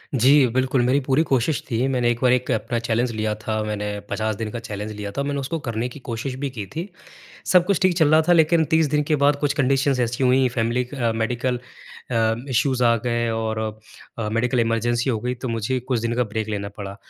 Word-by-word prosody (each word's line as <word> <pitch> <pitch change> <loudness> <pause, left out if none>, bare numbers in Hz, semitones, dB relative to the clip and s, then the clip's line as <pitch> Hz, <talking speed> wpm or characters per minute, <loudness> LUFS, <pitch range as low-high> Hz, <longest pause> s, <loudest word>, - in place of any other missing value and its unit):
जी, 135 +2 +5
बिल्कुल। 130 0 +1
मेरी 130 +3 +3
पूरी 135 +3 +2
कोशिश 135 -1 0
थी 120 +2 0
मैंने 125 -3 +1
एक 120 - -3
बार 125 -1 +4
एक 125 0 0
अपना 115 +2 -1
चैलेंज 120 +1 0
लिया 110 -1 -1
था। 110 0 -1
मैंने 105 -1 -3
50 110 0 -1
दिन 110 +1 -4
का 120 - -4
चैलेंज 105 -2 -6
लिया 105 -1 -6
था। 140 - +1
मैंने 140 0 -2
उसको 145 +5 -3
करने 115 +2 -1
की 135 - -11
कोशिश 120 +2 -3
भी 140 -1 -2
की 110 -6 -6
थी। 170 +5 -4 0.6
सब 180 -2 +6
कुछ 200 -1 +1
ठीक 185 -1 +4
चल 160 -3 +4
रहा 155 0 +6
था - - +7
लेकिन 165 0 +4
30 160 -1 +4
दिन 150 0 +2
के 155 - +3
बाद 145 0 +4
कुछ 145 -1 +1
कंडीशंस 135 0 +2
ऐसी 120 +2 0
हुईं 130 +1 +4
फैमिली 120 +1 0
अ, 125 -2 -2
मेडिकल 120 +2 -1 0.5
अ, 115 -2 +2
इश्यूज़ 130 0 +1
आ 115 0 +5
गए 120 -1 0
और 110 0 -2 0.6
अ, 110 - -2
मेडिकल 125 +2 +1
इमरजेंसी 115 +2 +1
हो 115 - 0
गई 125 +2 -2
तो 125 +1 -6
मुझे 115 +3 -1
कुछ 125 -1 -1
दिन 115 +1 -1
का 125 - +2
ब्रेक 110 -1 -2
लेना 100 -1 -3
पड़ा 100 -1 -7
125 Hz, 230 wpm, -22 LUFS, 115-135 Hz, 0.6 s, था